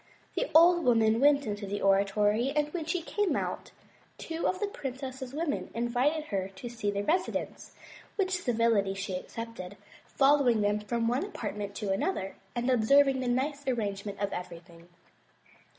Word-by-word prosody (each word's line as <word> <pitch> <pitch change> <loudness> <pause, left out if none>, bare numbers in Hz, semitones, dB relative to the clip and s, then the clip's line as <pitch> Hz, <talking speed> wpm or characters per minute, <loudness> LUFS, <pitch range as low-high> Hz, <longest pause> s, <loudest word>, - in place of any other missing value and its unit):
The - - -1
old 345 +1 +7
woman 225 -2 +3
weht 285 +1 +4
into 205 -1 -4
the 205 +1 -3
oratory 205 +5 +2
and 300 0 0
when 340 -3 -3
she 335 +1 -2
came 415 +3 0
out, - - -3 0.5
two 325 0 -3
of 370 - -1
the 415 - 0
princess's 265 -7 -6
women 300 +1 -2
invited 250 +7 +1
her 190 -1 0
to 240 +5 -7
see 230 -3 -3
the 200 0 -1
residence, 360 - -2 0.4
which 375 -3 0
civility 230 - +2
she 195 -1 -4
accepted, 205 -1 -7 0.3
following 270 -5 +3
them 205 +1 +1
from 230 +2 -1
one 245 +5 +1
apartment 205 - -5
to 205 -2 -2
another 195 - -1 0.2
and 240 +1 -1
observing 270 +3 +4
the 255 - -2
nice 280 +3 -1
arrangement 205 -5 -2
of 200 -1 -2
everything. 170 -1 -9
240 Hz, 155 wpm, -29 LUFS, 205-285 Hz, 0.5 s, old